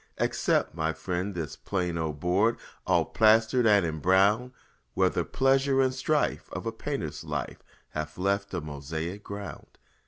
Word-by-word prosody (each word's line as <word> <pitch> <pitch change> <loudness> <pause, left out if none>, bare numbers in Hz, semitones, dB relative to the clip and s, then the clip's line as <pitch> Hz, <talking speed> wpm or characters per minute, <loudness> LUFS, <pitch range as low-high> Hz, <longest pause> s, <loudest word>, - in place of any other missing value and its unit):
Accept, - - +1
my 80 0 -1
friend, 90 +3 -3
this 80 -5 -4
plain 90 -3 -2
old 80 -3 -3
board 95 +8 +2 0.3
All - - +3
plastered 110 +2 +4
and 100 -4 +5
imbrowned, 95 - +2 0.4
Where - - +3
the - - 0
pleasure 135 0 +2
and 130 -1 +3
strife 145 +3 0
of - - -5
a 115 - -1
painter's 110 - -4
life - - -4 0.3
Have 75 0 -5
left 100 +2 0
a 90 - -2
mosaic 80 +6 -5
ground. 100 0 -8
100 Hz, 150 wpm, -28 LUFS, 80-115 Hz, 0.4 s, and